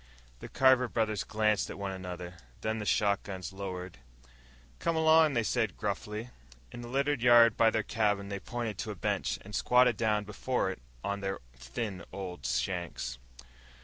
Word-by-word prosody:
The - - -9
Carver 130 -1 +4
brothers 110 -3 0
glanced 105 -1 +1
at - - -7
one 100 -1 -3
another, 90 -2 -7 0.2
then 110 +1 -1
the 105 - -4
shotguns 100 -4 0
lowered. 90 -6 -6 0.8
"Come 165 - 0
along," 160 -2 +5
they 115 - +2
said 110 -4 0
gruffly. 105 +3 -4 0.4
In 120 - -8
the 120 - -7
littered 140 +1 0
yard 120 -2 +7
by 115 - +5
their 110 -1 0
cabin, 105 -3 0
they 100 -1 -3
pointed 115 -2 -4
to - - -3
a - - -4
bench - - -1
and 105 - -11
squatted 125 -1 +4
down 105 -2 +1
before 105 0 -1
it 90 - -9 0.2
on 100 0 -2
their 95 0 -2 0.2
thin 90 - -5
old 95 -2 -5
shanks. 85 -9 -2
105 Hz, 165 wpm, -31 LUFS, 95-120 Hz, 0.8 s, yard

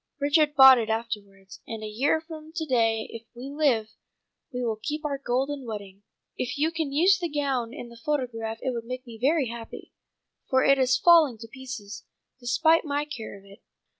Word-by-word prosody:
Richard 295 +1 +2
bought 265 -2 +9
it 225 -1 -3
afterwards. 205 -4 -5
And 225 -1 -6
a - - -4
year 255 +9 +1
from 315 -1 -10
to 325 -2 -3
day 225 -5 +1
if 230 0 -9
we 255 +3 -7
live, 260 -8 +1 0.6
we 250 -1 -3
will 220 -2 -2
keep 300 +4 -4
our 280 -2 -2
golden 270 +2 -1
wedding. 200 -4 -8 0.3
If 250 +3 -3
you 310 +3 +1
can 320 -4 -3
use 360 +6 +4
the 345 -2 -2
gown 275 -6 -1
in 245 -3 -8
the 235 - -13
photograph 235 -6 -2
it 260 - 0
will 235 -2 -3
make 255 +3 -7
me 230 -2 -11
very 280 -1 +2
happy, 230 -1 -9 0.6
for 260 0 +3
it 275 0 +4
is 255 -1 +3
falling 320 -6 +5
to 225 +1 -10
pieces, 230 -5 -8 0.3
despite 315 +7 +3
my 290 -1 -1
care 235 -9 -8
of 195 - -18
it. 200 0 -16
255 Hz, 195 wpm, -26 LUFS, 225-290 Hz, 0.6 s, bought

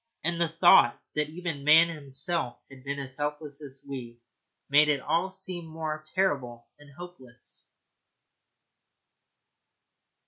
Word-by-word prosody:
And 170 +1 -1
the 170 - +3
thought 165 -7 +5
that 150 0 -1
even 165 -3 -5
man 160 +3 +7
himself 145 -2 -2
had 130 -1 -14
been 140 +1 -4
as 135 -2 -6
helpless 150 0 -5
as 140 -1 -11
we 125 -4 -7 0.5
made 150 +2 +5
it 145 -2 +2
all 165 +7 0
seem 185 -3 -5
more 155 -1 -5
terrible 130 -11 -1
and 145 -1 -16
hopeless. 130 -9 -13
150 Hz, 125 wpm, -28 LUFS, 135-170 Hz, 0.5 s, man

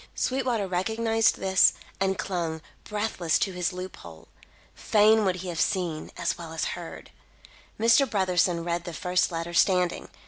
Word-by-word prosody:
Sweetwater 250 -5 0
recognised 225 +5 +1
this, 190 -1 +4 0.3
and 190 0 0
clung, 165 -4 -3 0.2
breathless, 205 -6 -1
to 195 - -1
his 180 -1 -2
loop 185 0 -7
hole. 80 -2 -13 0.4
Fain 215 0 +3
would 185 -1 +1
he - - -4
have 170 -2 -2
seen, 170 -5 -1
as - - -2
well 165 -1 -8
as 160 - -2
heard. 175 -1 -9 0.7
Mr. 235 +4 +4
Brotherson 180 -4 +1
read 170 0 -2
the 175 - -6
first 180 +3 0
letter, 165 +1 -4
standing. 180 0 +2
180 Hz, 150 wpm, -26 LUFS, 170-210 Hz, 0.7 s, this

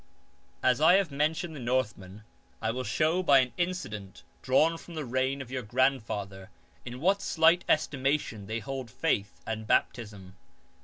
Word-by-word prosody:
19. 130 - +5
As 125 - -3
I 160 +4 +7
have 190 -5 +1
mentioned 155 +3 -1
the - - -7
Northmen 115 -5 -2 0.4
I 110 0 -1
will 130 +2 -4
show 160 +6 +1
by 145 -6 +5
an 125 -2 +2
incident 105 - -4 0.2
dravirn 155 +5 +2
from 170 - -12
the 155 -2 -4
reign 130 +2 -1
of 125 - -15
your 130 -1 -2
grandfather 105 -6 -1 0.3
in 125 +1 -7
what 195 +6 +2
slight 165 +2 +3
estimation 135 -8 0
they 110 +2 -3
hold 130 +2 -5
faith 110 -6 -2
and 110 -1 -4
baptism. 100 -6 -1
130 Hz, 160 wpm, -29 LUFS, 110-155 Hz, 0.4 s, I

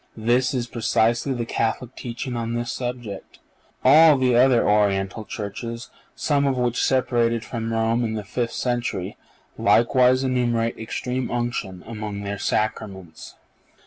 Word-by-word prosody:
This 120 +4 +1
is 120 -2 -1
precisely 115 +2 +1
the 120 -1 -3
Catholic 115 +2 -2
teaching 120 +1 -5
on 115 0 -3
this 120 0 -2
subject. 120 -5 -6 0.5
All 150 +2 +7
the 130 -2 +2
other 125 -1 +4
Oriental 100 0 +1
churches, 115 +3 -6 0.2
some 140 -2 +1
of 135 -2 0
which 125 -1 0
separated 115 -3 +1
from 115 -2 -4
Rome 115 +1 +1
in 110 -1 -2
the 105 - -4
fifth 115 +4 -3
century, 120 -6 -2 0.4
likewise 125 +2 +4
enumerate 120 -3 0
Extreme 125 +3 -3
Unction 120 -7 -3
among 105 -2 -6
their 100 0 -4
Sacraments. 100 -6 -3
115 Hz, 135 wpm, -23 LUFS, 110-125 Hz, 0.5 s, All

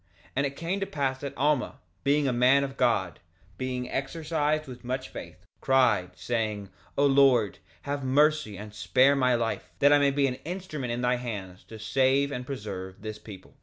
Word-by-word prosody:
2:30 - - -33
And 140 - +2
it 140 - -8
came 170 +6 -2
to 195 - -1
pass 135 -2 -2
that 140 - -6
Alma, 140 -2 +1 0.3
being 145 0 +2
a 130 - +1
man 130 +3 +4
of 135 -1 -5
God, 100 - +1 0.4
being 125 -1 -3
exercised 155 +1 -1
with 125 -2 -10
much 130 +1 -3
faith, - - -10
cried, 115 -9 +2
saying: 110 -4 -2 0.3
O 140 - +4
Lord, 135 -6 +4 0.2
have 140 0 -3
mercy 145 -4 +2
and 105 +1 -9
spare 115 +9 +3
my 125 -2 +3
life, 115 -1 -2
that 145 +1 +5
I 145 - +6
may 140 0 +4
be 140 0 +1
an 130 -1 -2
instrument 160 -7 -5
in 120 +1 -2
thy 125 0 +2
hands 100 -7 -6
to 110 - -10
save 135 +5 +2
and 125 -1 -5
preserve 100 -7 -6
this 110 -1 -6
people. 100 -3 -12
130 Hz, 190 wpm, -27 LUFS, 110-140 Hz, 0.4 s, I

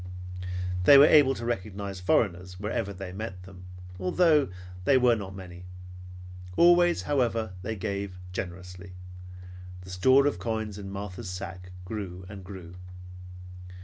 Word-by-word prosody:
They 140 - +9
were 140 - +9
able 145 -3 +6
to 115 - -6
recognize 100 -3 -4
foreigners 90 -1 0
wherever 105 0 -2
they 95 -1 -7
met 95 -2 -6
them, 90 -1 -12 0.3
although 150 - +3 0.3
they 135 +7 +5
were 125 -2 +4
not 95 -3 -7
many. 90 -1 -10 0.9
Always, 175 0 +5
however, 115 -7 0
they 110 +4 -4
gave, 100 -1 -4
and 90 - -13
gave - - -13
generously. 90 0 -7 0.9
The 95 +1 -11
store 130 +10 +4
of 145 - 0
coins 110 -3 -3
in 100 -1 -7
Martha's 100 +1 -6
sack 90 0 -7 0.2
grew 95 -3 -6
and 100 -1 -9
grew. 90 -3 -10
100 Hz, 140 wpm, -28 LUFS, 90-115 Hz, 0.9 s, They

